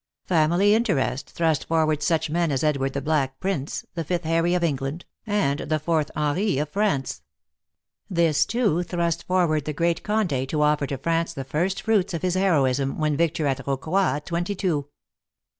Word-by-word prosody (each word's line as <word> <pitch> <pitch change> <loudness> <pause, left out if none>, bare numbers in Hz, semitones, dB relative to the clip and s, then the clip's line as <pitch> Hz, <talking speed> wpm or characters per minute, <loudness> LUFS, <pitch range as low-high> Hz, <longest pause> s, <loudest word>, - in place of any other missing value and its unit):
Family 175 +4 +3
interest 175 - 0
thrust 160 -4 0
forward 155 -2 +1
such 160 +1 +1
men 165 +1 0
as 135 0 -1
Edward 135 -3 0
the 140 - -3
Black 140 -4 0
Prince, 185 -7 -3
the 170 - -3
fifth 175 +2 -2
Harry 165 +2 +1
of 180 - 0
England, 145 +1 -2 0.2
and 200 -10 +1
the 155 - -1
fourth 155 -1 0
Henri 150 +4 0
of 150 +1 -1
France. 150 - -1 0.9
This, 165 -5 +3
too, 210 -7 +1
thrust 170 -1 -2
forward 170 -5 +1
the 150 - -2
great 170 +3 0
Conde 175 -12 -1
to 150 +1 0
offer 150 -1 +2
to 135 - -3
France 165 +4 -1
the 135 - -4
first 175 +8 -1
fruits 200 -5 +1
of 170 - -5
his 180 -1 +1
heroism, 140 -8 +1
when 155 -1 +1
victor 160 0 0
at 135 -2 -1
Rocroi, 155 +7 0
at 150 - -6
twenty 175 +4 -2
two. 160 -7 -1
160 Hz, 175 wpm, -24 LUFS, 145-175 Hz, 0.9 s, Family